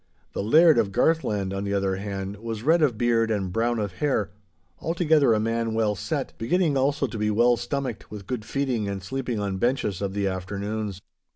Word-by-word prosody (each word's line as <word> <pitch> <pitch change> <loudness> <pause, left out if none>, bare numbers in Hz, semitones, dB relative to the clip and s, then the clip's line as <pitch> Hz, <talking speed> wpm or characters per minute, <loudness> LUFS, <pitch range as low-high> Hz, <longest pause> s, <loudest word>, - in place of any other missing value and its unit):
The - - -2
Laird 155 +7 +6
of 105 -4 +1
Garthland, 105 -7 +1
on 100 0 -3
the 100 0 -1
other 95 -1 0
hand, 100 0 -5
was 115 0 -5
red 160 +4 +4
of 130 -8 +2
beard 115 -1 +2
and 95 -4 -1
brown 120 +2 +1
of 105 -3 -2
hair, 105 - -1 0.5
altogether 160 -5 +3
a 110 - +3
man 115 0 -1
well 110 -2 +2
set, 95 - -3
beginning 160 +5 +1
also 140 +2 +1
to 120 - -5
be 105 0 +1
well 120 +3 +4
stomached 120 0 -4
with 105 -2 -8
good 120 +1 -4
feeding 125 -4 -1
and 100 -1 -4
sleeping 125 +1 -3
on 100 -2 -2
benches 120 -5 0
of 100 -1 -3
the 100 -1 0
afternoons. 100 +2 -3
110 Hz, 195 wpm, -25 LUFS, 100-130 Hz, 0.5 s, Laird